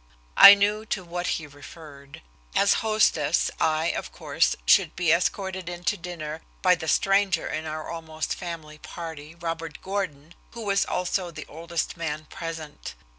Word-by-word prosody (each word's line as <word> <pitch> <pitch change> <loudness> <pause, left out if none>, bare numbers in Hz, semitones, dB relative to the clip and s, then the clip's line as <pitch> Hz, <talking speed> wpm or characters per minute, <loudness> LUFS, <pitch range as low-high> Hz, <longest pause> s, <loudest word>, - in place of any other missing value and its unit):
I 200 - +12
knew 205 +2 +1
to 195 - -2
what 175 +1 -4
he 160 - -8
referred. 145 - -13 0.3
As 200 0 +5
hostess, 205 -8 +2
I, 160 +1 +2
of - - -5
course, - - 0
should - - +4
be 175 -3 +2
escorted 185 +1 0
in 175 0 -7
to - - +1
dinner 165 -3 -6 0.2
by 185 -1 +6
the 165 -2 -4
stranger 195 +2 +2
in 155 +1 -4
our 155 0 -5
almost 160 -1 -4
family 160 -4 -7
party, 160 -2 -8
Robert 165 -2 -5
Gordon, 175 -6 -4 0.2
who 230 -2 -7
was 200 -1 +2
also 180 0 -1
the 155 -2 -8
oldest 170 +2 -4
man 155 -2 -4
present. 160 -3 -7
170 Hz, 155 wpm, -25 LUFS, 155-185 Hz, 0.3 s, I